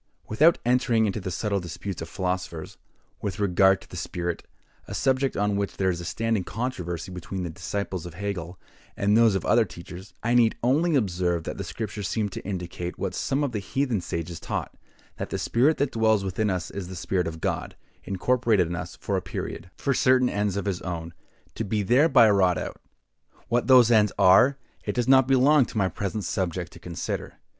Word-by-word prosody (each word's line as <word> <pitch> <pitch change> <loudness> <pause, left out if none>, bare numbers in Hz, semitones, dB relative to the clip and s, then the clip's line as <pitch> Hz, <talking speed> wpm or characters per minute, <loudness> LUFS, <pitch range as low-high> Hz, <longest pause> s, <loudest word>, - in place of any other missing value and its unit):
Without 155 +10 +4
entering 120 -2 +3
into 105 +1 -1
the 95 -1 -4
subtle 100 +2 -1
disputes 90 +1 -6
of 80 - -6
philosophers, 90 -2 -4 0.4
with 100 -2 -4
regard 95 -1 +4
to - - -15
the - - -11
spirit, 85 -1 -3 0.5
a - - -5
subject 135 0 +1
on 105 0 +1
which 100 0 -2
there 95 -1 +2
is 85 -1 -4
a - - -7
standing 115 +1 -1
controversy 95 -7 -4
between 90 +1 -5
the 85 - -4
disciples 90 +1 -4
of 85 - -10
Hegel 90 -3 -5 0.4
and 100 +1 +2
those 115 -3 +5
of 95 - -2
other 120 - +4
teachers, 90 0 -10
I 115 +2 +1
need 120 -2 +4
only 150 +7 +3
observe 90 - 0
that - - -6
the - - -2
Scriptures 105 -3 -5
seem 105 -1 -1
to - - -7
indicate 90 -2 -5
what - - -3
some 140 +2 -1
of 140 - -1
the 110 - -2
heathen 120 +1 -1
sages 85 0 -4
taught, - - -4 0.4
that - - -4
the - - -2
spirit 135 +7 +2
that 140 -1 0
dwells 110 -2 +2
within 100 +3 -1
us 90 -2 -2
is 100 -3 -5
the 95 - -8
spirit 90 0 -1
of 80 0 -6
God, - - -3 0.3
incorporated 110 0 +2
in 85 +1 -4
us - - -6
for - - -2
a - - -1
period, 90 - -6
for 140 - 0
certain 130 0 +4
ends 100 -1 -1
of 100 - -2
his 95 -3 -2
own, 85 -2 -5 0.4
to - - -3
be 105 0 -1
thereby 125 - +5
wrought 95 -4 +3
out. - - -6 0.7
What 120 +1 +1
those 125 -3 +7
ends 105 -3 +5
are, 125 +9 +6 0.3
it - - -2
does 120 -1 0
not 130 -1 +6
belong 135 +1 +5
to - - -8
my 95 -3 +2
present 100 +4 -3
subject 90 -3 -2
to - - -13
consider. 85 -3 -5
100 Hz, 200 wpm, -26 LUFS, 90-120 Hz, 0.7 s, those